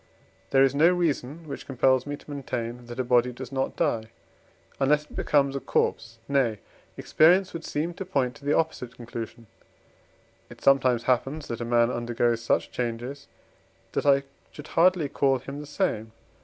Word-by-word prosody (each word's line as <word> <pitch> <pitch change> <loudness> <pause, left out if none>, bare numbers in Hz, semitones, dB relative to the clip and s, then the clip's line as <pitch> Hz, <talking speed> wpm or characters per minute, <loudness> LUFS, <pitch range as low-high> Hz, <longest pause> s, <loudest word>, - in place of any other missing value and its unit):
There 135 +4 +5
is 135 -1 +3
no 155 +4 +5
reason, 160 -3 -1
which 140 - -7
compels 130 0 +2
me 145 0 -4
to 150 - -13
maintain 120 -3 -5
that 120 +1 -8
a - - +2
body 125 0 +3
does 125 0 -9
not 135 0 -2
die, 120 -9 0 0.7
unless 145 +2 +3
it - - -16
becomes 140 -2 +2
a - - -1
corpse; 115 -3 -1
nay, 130 -6 +1 0.4
experience 180 +4 +4
would 165 -1 -6
seem 160 +4 -2
to 190 - -6
point 135 -9 0
to - - -20
the 145 - +2
opposite 125 -6 -2
conclusion. 115 -1 -7 1.0
It - - -13
sometimes 130 -3 +3
happens, 135 +5 0
that 115 0 -4
a - - -2
man 120 0 +3
undergoes 120 -1 0
such 115 - 0
changes, 125 +3 -4 0.6
that - - -1
I 140 0 +5 0.3
should 150 0 -11
hardly 175 -2 +3
call 135 -1 +2
him 140 +3 -8
the 150 - -8
same. 125 - -1
135 Hz, 170 wpm, -26 LUFS, 120-150 Hz, 1.0 s, There